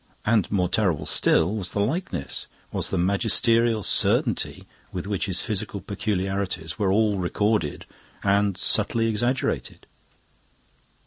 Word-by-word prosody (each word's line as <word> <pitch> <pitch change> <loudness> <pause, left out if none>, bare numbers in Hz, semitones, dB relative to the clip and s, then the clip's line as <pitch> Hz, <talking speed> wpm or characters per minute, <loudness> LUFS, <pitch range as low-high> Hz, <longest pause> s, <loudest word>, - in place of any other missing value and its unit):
And, 105 -4 +1
more 90 -3 +1
terrible 90 -3 +1
still, 85 +5 +3
was 95 -3 -3
the - - -2
likeness, 115 - -3 0.2
was - - -1
the - - -2
magisterial 115 +4 +2
certainty - - +2 0.3
with 90 -1 -5
which 100 -1 -2
his 95 -1 -1
physical 105 -2 -2
peculiarities 100 -5 -3
were 100 -3 +1
all 105 -1 +2
recorded 100 -2 -1 0.4
and 100 -1 +2
subtly 115 -1 +3
exaggerated. 120 +4 -2
100 Hz, 120 wpm, -24 LUFS, 95-110 Hz, 0.4 s, still